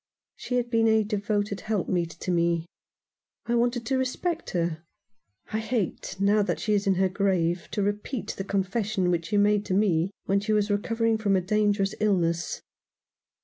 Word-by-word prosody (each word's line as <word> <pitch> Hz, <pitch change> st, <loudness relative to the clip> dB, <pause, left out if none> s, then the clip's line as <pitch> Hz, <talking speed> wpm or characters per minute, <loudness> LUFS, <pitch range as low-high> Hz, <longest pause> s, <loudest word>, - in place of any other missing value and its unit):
She 250 Hz, -, -4 dB
had 240 Hz, -1 st, 0 dB
been 225 Hz, -1 st, +3 dB
a 220 Hz, 0 st, +4 dB
devoted 205 Hz, -1 st, -1 dB
helpmeet 185 Hz, -5 st, -1 dB
to 185 Hz, -, -1 dB
me. 170 Hz, -1 st, +1 dB, 0.8 s
I 235 Hz, -, -1 dB
wanted 240 Hz, 0 st, +1 dB
to 260 Hz, +3 st, +1 dB
respect 325 Hz, +7 st, -2 dB
her. 170 Hz, -2 st, -1 dB, 0.7 s
I 220 Hz, -, +1 dB
hate, 220 Hz, -4 st, -2 dB
now 205 Hz, +2 st, +4 dB
that 200 Hz, -, -1 dB
she 215 Hz, -, 0 dB
is 200 Hz, 0 st, +1 dB
in 195 Hz, -, +4 dB
her 190 Hz, +1 st, +3 dB
grave, 185 Hz, -3 st, 0 dB
to 205 Hz, -, -1 dB
repeat 205 Hz, +4 st, -3 dB
the 195 Hz, -, -4 dB
confession 195 Hz, -1 st, 0 dB
which 170 Hz, -1 st, -1 dB
she 205 Hz, -, 0 dB
made 205 Hz, 0 st, +3 dB
to 185 Hz, -, -1 dB
me 185 Hz, -4 st, +2 dB, 0.2 s
when 195 Hz, +1 st, +2 dB
she 210 Hz, +2 st, -1 dB
was 210 Hz, 0 st, +2 dB
recovering 225 Hz, +2 st, +1 dB
from 200 Hz, -3 st, +2 dB
a 185 Hz, -, +2 dB
dangerous 205 Hz, 0 st, +1 dB
illness." 175 Hz, -5 st, 0 dB
205 Hz, 175 wpm, -26 LUFS, 185-220 Hz, 0.8 s, a